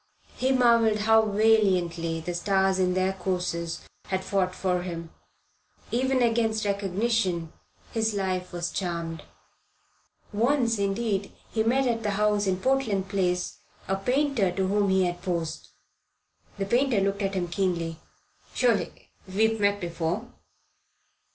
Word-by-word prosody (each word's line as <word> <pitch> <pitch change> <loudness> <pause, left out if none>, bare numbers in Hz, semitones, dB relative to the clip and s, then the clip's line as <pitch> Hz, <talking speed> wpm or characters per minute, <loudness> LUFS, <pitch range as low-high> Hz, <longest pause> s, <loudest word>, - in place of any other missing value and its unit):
He 260 +1 +1
marvelled 230 -4 +4
how 220 0 +4
valiantly 185 -6 +2
the 175 +2 -4
stars 190 +1 +1
in 180 -1 +2
their 185 +1 +1
courses 180 -3 -2 0.2
had 190 0 -2
fought 185 -1 0
for 180 -2 0
him. 170 -2 -6 0.8
Even 260 +1 +2
against 225 -2 +1
recognition 195 -3 0 0.4
his 220 -2 0
life 185 -2 -2
was 175 0 -3
charmed. 170 -3 -3 1.1
Once, 235 0 +2
indeed, 200 0 -1 0.2
he 220 - 0
met 255 +5 +2
at 235 -2 0
the 210 - -1
house 210 -1 +2
in 185 -1 +1
Portland 210 -4 0
Place 180 -3 -1 0.3
a 195 - +1
painter 250 -1 +1
to 190 +1 -1
whom 200 0 +2
he 190 -1 +3
had 175 0 -3
posed. 170 -3 -3 0.9
The 195 - -1
painter 240 +1 +2
looked 200 +1 0
at 195 0 -1
him 180 -2 -1
keenly. 170 -3 -1 0.6
"Surely 240 -5 0 0.2
we 210 +4 +2
have 225 0 -3
met 205 0 +2
before?" 170 -2 -3
195 Hz, 135 wpm, -27 LUFS, 180-220 Hz, 1.1 s, marvelled